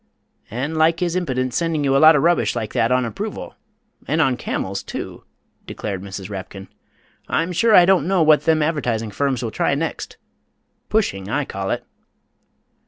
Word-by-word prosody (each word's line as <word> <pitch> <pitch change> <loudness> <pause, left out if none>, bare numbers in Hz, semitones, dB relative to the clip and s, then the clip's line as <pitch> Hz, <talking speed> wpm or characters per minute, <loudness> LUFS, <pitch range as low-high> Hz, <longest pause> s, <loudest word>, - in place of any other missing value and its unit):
"And 140 +8 -3
like 160 +1 +3
his 175 -1 -1
impidence 130 -8 -1
sending 165 -3 0
you 135 -1 +2
a - - +5
lot 155 +1 +8
o' - - +4
rubbish 150 -8 +2
like 110 -1 -4
that 115 - +1
on 125 -1 +2
approval 205 - -6 0.5
and 155 +3 0
on 135 -5 +3
camels, 95 -5 -3
too!" - - -7 0.4
declared 100 -3 -5
Mrs. 95 -1 -7
Rapkin. 95 -1 -8 0.6
"I'm 165 +2 0
sure 220 +5 +3
I 175 - +8
don't 180 -4 +3
know 185 -3 +3
what 155 -1 +4
them 160 -1 +3
advertising 120 -9 -1
firms 130 +2 -1
will 115 - -3
try 140 - 0
next 160 +3 -4 0.7
pushing, 100 - 0
I 145 +5 -1
call 95 -3 -5
it." - - -2
140 Hz, 170 wpm, -21 LUFS, 110-165 Hz, 0.7 s, lot